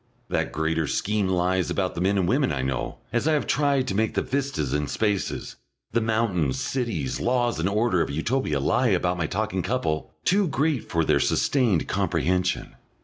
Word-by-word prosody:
That - - -1
greater 80 0 0
scheme 105 +3 0
lies 90 0 +1
about 95 -2 -1
the 85 - -4
men 100 +2 +2
and 95 -2 +1
women 130 +5 +2
I 65 -3 -2
know, 65 -1 -2 0.2
as 120 +5 +1
I 160 - +3
have 150 - +1
tried 140 -2 +1
to - - -1
make 110 +2 0
the - - +1
vistas 135 - -2
and 75 -1 -1
spaces, 105 -3 -2 0.3
the 115 - +1
mountains, 110 - 0
cities, 115 - -2
laws, 120 -3 +1
and 85 +4 +1
order 105 -3 +2
of - - -1
Utopia 80 - 0
lie 125 - +2
about 90 -3 +1
my 80 - 0
talking 100 0 -1
couple, 85 -7 -2
too 195 +1 +3
great 145 -3 0
for 80 -1 +1
their - - +3
sustained 120 - +2
comprehension. 90 +3 0
100 Hz, 185 wpm, -25 LUFS, 85-125 Hz, 0.3 s, I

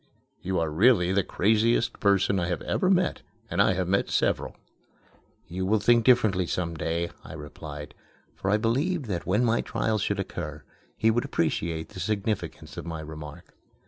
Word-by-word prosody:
You 95 +1 -2
are 80 -2 0
really 95 +1 +4
the 100 - +3
craziest 110 +6 +2
person 100 -3 +3
I 85 - -1
have 90 - -2
ever 185 - +1
met, 185 -1 +2 0.3
and - - +2
I - - +4
have 90 -1 -1
met 100 +2 +1
several." - - 0 0.9
"You 90 +2 -4
will 105 +3 +2
think 120 +3 +4
differently 110 -8 +4
some 85 -1 -2
day," 85 +2 -2
I - - -10
replied; 75 -1 -8 0.4
for 95 - -3
I 105 - +4
believed 140 - 0
that 90 -6 -4
when 105 +6 +2
my 115 0 +2
trial 110 -1 -1
should 100 0 -1
occur, 75 -5 -5 0.3
he 115 - +3
would 120 +2 +1
appreciate 80 0 -1
the - - -10
significance 100 -1 -3
of - - -5
my 80 -1 -4
remark. 75 -1 -9
95 Hz, 175 wpm, -27 LUFS, 85-110 Hz, 0.9 s, really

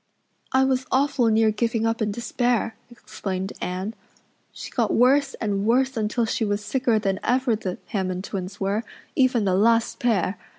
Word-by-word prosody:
"I 260 0 +4
was 260 -1 0
awfully 260 -3 +2
near 220 0 +4
giving 225 +1 0
up 225 0 0
in 210 -1 +1
despair," 235 +1 -1
explained 195 -5 -5
Anne. 185 +4 -3 0.6
"She - - -9
got 230 -4 0
worse 270 +3 +3
and 200 -3 -2
worse 260 +4 +2
until 225 +2 0
she 225 +1 -1
was 205 0 -1
sicker 250 -4 +1
than 195 -3 -1
ever 250 -1 +2
the 190 -4 -4
Hammond 185 -2 -2
twins 195 0 -5
were, 200 +3 0 0.3
even 255 -5 +3
the 190 - +2
last 230 +4 +2
pair. 205 -5 0
225 Hz, 165 wpm, -24 LUFS, 200-245 Hz, 0.6 s, I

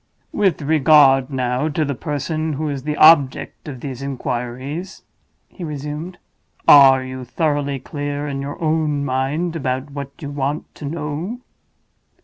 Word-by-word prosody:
"With 190 -7 +1
regard, 140 -3 +5
now, 130 +2 -1
to 155 +1 0
the 140 - -2
person 155 +3 -3
who 150 +2 -2
is 140 -2 -3
the 150 +2 -3
object 155 -4 +4
of 130 -5 -7
these 135 -2 -6
inquiries," 135 +6 -5 0.4
he 185 - -10
resumed. 150 +3 -5 0.5
"Are 135 -2 +8
you 130 0 -7
thoroughly 145 +1 -1
clear 145 +2 -4
in 135 -1 -3
your 140 +1 -6
own 155 -3 0
mind 145 +6 -1
about 130 -1 -3
what 140 -1 -6
you 145 -4 -6
want 145 +1 -3
to 150 - -9
know?" 160 - -4
145 Hz, 140 wpm, -20 LUFS, 135-155 Hz, 0.5 s, Are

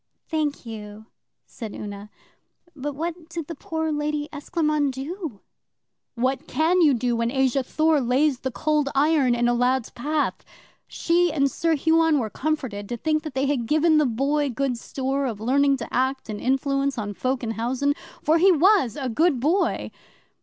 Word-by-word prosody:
'Thank 300 -4 -2
you,' 215 -1 -8 0.4
said 225 -4 -8
Una. 205 0 -7 0.7
'But 290 0 -4
what 335 +2 -5
did 330 -2 -5
the 330 - -6
poor 320 +1 -3
Lady 295 0 -2
Esclairmonde 300 -1 0
do?' 280 - -6 0.7
'What 260 +5 -1
can 340 +4 +2
you 295 -5 +5
do 240 0 0
when 230 0 0
Asa 265 0 +2
Thor 310 +3 +2
lays 260 +2 +2
the 260 - -3
Cold 300 +2 0
Iron 280 -3 +3
in 240 0 +1
a 240 - +3
lad's 250 0 +1
path? 295 +5 -2 0.4
She 345 0 +1
and 275 -3 +1
Sir 330 -1 +1
Huon 320 +1 +3
were 225 -6 -2
comforted 260 -10 -3
to 240 - -3
think 310 +5 0
they 265 +1 0
had 270 -5 -1
given 310 +2 +4
the 300 - +3
Boy 280 +5 0
good 265 0 -1
store 270 +2 -2
of 220 -4 -4
learning 275 +4 +2
to 235 - -8
act 260 -1 0
and 210 -1 -5
influence 275 +1 0
on 205 -2 -3
folk 255 +4 -2
in 225 - -2
housen. 250 +6 0 0.3
For 320 +2 +3
he 380 +3 +6
was 355 - +4
a 265 - -2
good 290 +3 +2
boy! 320 +10 0
275 Hz, 170 wpm, -24 LUFS, 245-310 Hz, 0.7 s, he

